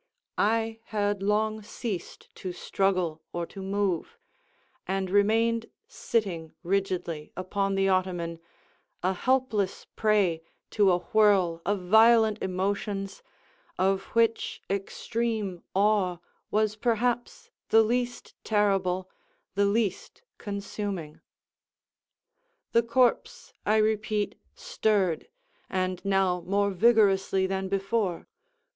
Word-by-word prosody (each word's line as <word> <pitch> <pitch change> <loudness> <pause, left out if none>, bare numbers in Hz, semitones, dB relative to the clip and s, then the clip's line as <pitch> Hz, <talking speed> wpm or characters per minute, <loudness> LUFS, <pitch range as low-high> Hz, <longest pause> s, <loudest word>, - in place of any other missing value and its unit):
I 225 +1 +1
had 205 -2 -1
long 215 +2 +1
ceased 205 -3 -6
to 185 -1 -5
struggle 185 -5 0
or 175 0 -3
to 195 - -10
move, 195 -2 -1 0.7
and 190 -1 -1
remained 225 +3 +2 0.2
sitting 175 -8 -2
rigidly 180 -4 -2
upon 195 +1 -1
the 195 0 +2
ottoman, 180 -3 0 0.6
a 185 +1 +2
helpless 240 -3 0
prey 200 -7 +2 0.3
to 205 -3 +4
a 175 - +3
whirl 185 -4 +3
of 200 -1 0
violent 220 +1 +5
emotions, 195 - -2 0.6
of 190 +1 +1
which 230 -1 +1
extreme 205 -1 -2
awe 195 -3 +2 0.3
was 215 0 +1
perhaps 240 +2 -1 0.2
the 225 0 +6
least 245 +2 -2
terrible, 195 -3 +1 0.5
the 200 +1 +2
least 215 - -1 0.2
consuming. 200 -5 -5 1.5
The 230 - +5
corpse, 235 +1 +1
I 215 - +4
repeat, 215 -1 +1 0.2
stirred, 195 -7 0 0.4
and 185 -1 -2
now 195 -2 +1
more 200 +1 +2
vigorously 195 -2 +3
than 190 0 -2
before. 195 -2 -1
200 Hz, 100 wpm, -27 LUFS, 185-220 Hz, 1.5 s, the